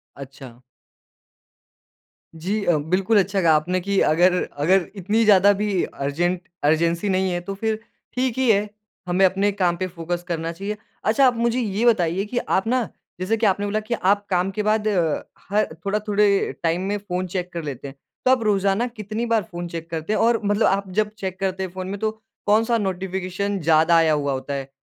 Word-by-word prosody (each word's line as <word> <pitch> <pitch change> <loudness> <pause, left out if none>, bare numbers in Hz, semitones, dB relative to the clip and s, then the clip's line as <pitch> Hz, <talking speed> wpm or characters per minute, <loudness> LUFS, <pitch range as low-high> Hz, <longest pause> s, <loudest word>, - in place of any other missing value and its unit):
अच्छा। 130 -3 -11 1.7
जी 195 +6 -2
अ, 175 - +3
बिल्कुल 185 +8 +2
अच्छा 195 0 0
कहा 165 -3 +5
आपने 180 +4 0
कि 200 +1 0
अगर 175 +4 +4 0.3
अगर 185 +2 +4
इतनी 210 +4 +1
ज़्यादा 200 -1 +6
भी 200 -4 0
अर्जेंट 170 +6 -2 0.2
अर्जेंसी 165 +5 +2
नहीं 185 0 +1
है 175 - -1
तो 195 +3 -5
फ़िर 220 +1 -2 0.4
ठीक 255 -1 0
ही 260 -3 +2
है। 210 0 +1 0.4
हमें 180 +2 +3
अपने 195 +2 +2
काम 185 -3 +1
पे 185 +1 -2
फ़ोकस 175 0 -4
करना 165 -1 -2
चाहिए। 200 +5 -5 0.3
अच्छा 225 +5 +4
आप 245 - +2
मुझे 235 +1 +1
ये 215 0 -1
बताइए 190 -4 +2
कि 240 +4 -5
आप 190 -3 0
ना 245 -2 +1 0.3
जैसे 205 +5 0
कि 225 - 0
आपने 200 0 +2
बोला 210 +1 0
कि 215 +2 -4
आप 205 -1 +1
काम 185 0 +1
के 210 - 0
बाद 215 0 +1
अ, 175 -7 +1 0.3
ह 210 +1 +3
थोड़ा 200 +6 -2
थोड़े 205 -1 +2
टाइम 170 +2 +1
में 205 - 0
फ़ोन 185 -2 -4
चेक 180 0 -4
कर 170 -1 -4
लेते 140 -2 -6
हैं। 135 - -10 0.3
तो 255 - +5
आप 250 -3 +3
रोज़ाना 200 +2 +1
कितनी 215 0 -5
बार 230 -3 +1
फ़ोन 175 0 -5
चेक 165 -1 -7
करते 165 +5 -2
हैं? - - +1
और 230 0 +3
मतलब 205 +2 +2
आप 195 0 0
जब 210 -1 +1
चेक 190 -3 -5
करते 190 0 -1
हैं 190 - -4
फ़ोन 185 0 -6
में। 200 +1 -5
तो 220 0 0 0.3
कौन-सा 225 +3 +3
नोटिफिकेशन 190 0 -2
ज़्यादा 160 +1 +4
आया 160 -1 +4
हुआ 145 -2 0
होता 135 +2 -4
है? 135 -1 -4
190 Hz, 200 wpm, -22 LUFS, 175-210 Hz, 1.7 s, ज़्यादा